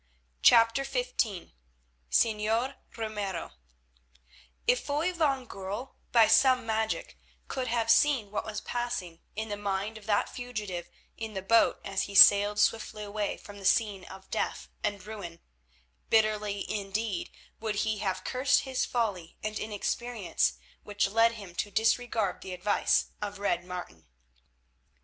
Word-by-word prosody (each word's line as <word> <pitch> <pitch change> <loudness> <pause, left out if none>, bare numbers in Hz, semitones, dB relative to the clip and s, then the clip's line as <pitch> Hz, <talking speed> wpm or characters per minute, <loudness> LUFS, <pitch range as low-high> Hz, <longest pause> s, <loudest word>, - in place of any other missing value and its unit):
CHAPTER 230 - +6
XV - - -2 1.0
SEÑOR 225 - +1 0.2
RAMIRO 205 -6 -4 1.1
If 250 - +3
Foy 305 +5 0
van 280 -6 +1
Goorl, 205 +5 -6 0.2
by 230 -2 +6
some 255 -2 +5
magic, 220 - -2 0.3
could 260 -1 -3
have 230 -1 +2
seen 245 -6 +3
what 210 - -2
was 215 -1 -5
passing 240 -10 -4 0.2
in 220 +1 -4
the 205 - -3
mind 205 +2 -3
of 210 - -17
that 205 -1 +2
fugitive 210 -8 -5 0.3
in 220 -2 -6
the 190 - -3
boat 230 +4 +4
as 195 -1 -1
he 200 - -8
sailed 205 +1 +8
swiftly 215 0 +1
away 205 0 -3
from 205 -1 -12
the - - -11
scene 200 -1 +2
of 190 0 -12
death - - -2
and 200 -2 -2
ruin, 195 -6 -8 0.7
bitterly 210 -2 +2
indeed 205 -1 -3 0.3
would 220 -1 -2
he 215 -1 -1
have 185 -2 -2
cursed 260 +2 +2
his 260 -2 -1
folly 200 -9 -2
and 215 0 -3
inexperience 215 -2 -1 0.3
which 205 -1 0
led 225 +3 +3
him 200 -6 -10
to 205 - -2
disregard 225 -1 +1
the 185 - -6
advice 200 +3 +1
of 205 0 -4
Red 175 -3 0
Martin. 175 - -8
215 Hz, 140 wpm, -29 LUFS, 200-230 Hz, 1.1 s, sailed